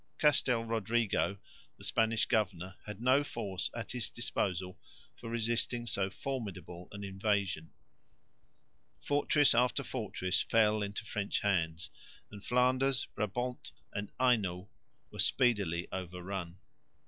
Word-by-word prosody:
Castel 130 -5 +3
Rodrigo, 115 -2 +1 0.4
the - - -13
Spanish 110 0 +2
governor, 95 -5 0
had 105 -1 -6
no 130 +4 +4
force 100 -9 -3
at 120 - -4
his 125 -3 -2
disposal 90 -6 -2 0.4
for 115 - -8
resisting 120 +1 0
so 100 -3 0
formidable 95 -8 -5
an 100 0 -7
invasion; 95 -4 -1 1.3
fortress 145 0 +4
after 125 +3 +3
fortress 105 -7 -1
fell 110 -2 +3
into 100 +2 -3
French 100 -1 -1
hands; 85 -5 0 0.4
and 100 -1 -10
Flanders, 130 +2 +2
Brabant 120 +5 -3 0.2
and 100 0 -4
Hainault 105 -7 +2 0.4
were - - -10
speedily 100 -10 +3
overrun. 90 -1 -5
105 Hz, 110 wpm, -33 LUFS, 95-120 Hz, 1.3 s, no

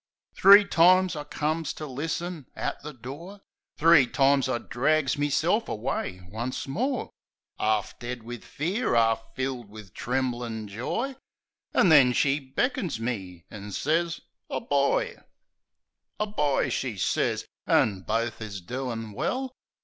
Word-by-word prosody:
Three 200 +1 +8
times 185 0 +4
I 150 -1 -5
comes 155 +1 -2
to 155 - -7
listen 155 +2 -4
at - - -3
the 150 - -7
door; 150 - -9 0.4
Three 155 -4 +6
times 135 +1 +3
I 125 - +1
drags 140 +4 +1
meself 155 +9 +1
away 100 -4 -3
once 115 +9 -4
more; 250 - -2 0.5
'Arf 110 -1 +1
dead 120 -1 -5
wiv 120 0 -8
fear; 175 - -1
'arf 115 -1 +3
filled 130 -4 -3
wiv 105 -3 -12
tremblin' 120 -3 -2
joy 230 - -3 0.6
An' 190 - +5
then 135 -5 +7
she 140 +4 +2
beckons 145 - -2
me, 95 -7 -4
an' 105 0 -8
sez 165 - 0
— - - -60
"A - - -2
boy!" - - +1 1.0
"A 210 - +1
boy!" 150 -10 0
she 120 -6 -2
sez. - - 0 0.2
"An' 100 -3 +3
bofe 115 +3 -2
is 105 -3 -5
doin' 115 +2 -5
well!" 260 - -2
135 Hz, 135 wpm, -27 LUFS, 115-165 Hz, 1.0 s, Three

